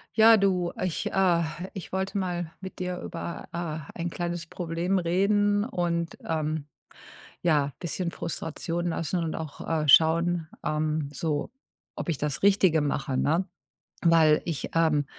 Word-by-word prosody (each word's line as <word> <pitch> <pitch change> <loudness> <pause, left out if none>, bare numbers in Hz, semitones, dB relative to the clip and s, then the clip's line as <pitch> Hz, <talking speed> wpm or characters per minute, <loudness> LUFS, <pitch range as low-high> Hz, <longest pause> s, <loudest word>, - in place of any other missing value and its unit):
Ja, 225 0 +8
du, 185 -4 +1
ich, 185 -3 -1
äh 180 -3 +3 0.3
ich 190 - -8
wollte 190 +1 -1
mal 175 -3 -2
mit 190 -1 -8
dir 180 -1 -3
über, 170 0 -6
äh, 160 -3 -4
ein 175 0 -2
kleines 175 -1 -3
Problem 175 +3 -1
reden. 205 +4 +2
Und, 170 -7 -2
ähm, 155 -1 -1 0.8
ja, 150 -4 +2
bisschen 175 0 -3
Frustration 170 +1 -3
lassen 165 +1 -1
und 160 - -2
auch, 155 -3 -6
äh, 155 -2 0
schauen, 165 +3 +5 0.2
ähm, 155 -1 -1
so 150 -1 -2 0.5
ob - - -4
ich 160 - 0
das 145 -1 -2
Richtige 190 -5 +5
mache, 140 -2 -1
ne? 165 +8 +2 0.6
Weil 165 -3 +5
ich, 165 -5 -3
ähm, 155 -3 +3
170 Hz, 140 wpm, -27 LUFS, 155-180 Hz, 0.8 s, Ja